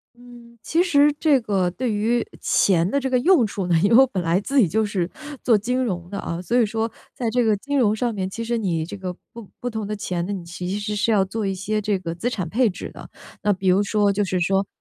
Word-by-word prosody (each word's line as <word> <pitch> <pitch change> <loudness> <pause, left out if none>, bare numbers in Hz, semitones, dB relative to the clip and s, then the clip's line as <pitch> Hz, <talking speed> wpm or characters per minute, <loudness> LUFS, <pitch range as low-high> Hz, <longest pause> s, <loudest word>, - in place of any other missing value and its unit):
嗯， 240 -1 -16
其 335 +2 +2
实 295 -4 +4
这 290 -5 +3
个 195 -5 0
对 245 +6 -3
于 225 +3 +1 0.2
钱 175 -2 +2
的 280 +6 0
这 265 - -2
个 255 -1 +2
用 315 - +4
处 195 -2 -4
呢， 175 - +1
因 200 - +3
为 230 - +6
我 265 +1 +8
本 185 -7 -3
来 170 +2 +2
自 275 +6 -1
己 190 - +4
就 220 +6 +1
是 190 -4 -2 0.3
做 230 -3 +4
金 250 +5 -1
融 180 -6 -3
的 200 - -4
啊， 170 -1 -4
所 240 +6 +1
以 225 - +3
说 225 +1 -2 0.2
在 235 -3 -2
这 245 +1 +2
个 215 -2 +2
金 285 +7 -2
融 215 -3 +3
上 235 -1 -1
面， 190 -2 -2
其 230 +4 -5
实 235 0 -1
你 170 -6 -1
这 175 - -8
个 185 -1 -5 0.2
不 230 -4 -11
不 245 - -4
同 220 -2 -4
的 210 0 -3
钱 175 -3 -3
呢， 205 - -3
你 185 -3 -5
其 175 +1 -6
实 210 0 -3
是 220 +2 +1
要 200 -3 +4
做 205 +2 -3
一 195 - -1
些 210 +3 -2
这 205 -2 0
个 170 -2 -5
资 225 +8 -2
产 190 -8 -3
配 230 +7 +2
置 180 - -6
的。 - - -11 0.3
那 205 - +1
比 190 0 -2
如 190 +3 +4
说 205 -1 +2
就 205 +1 0
是 185 -2 -1
说 195 +3 +1
210 Hz, 290 characters per minute, -22 LUFS, 190-235 Hz, 0.3 s, 我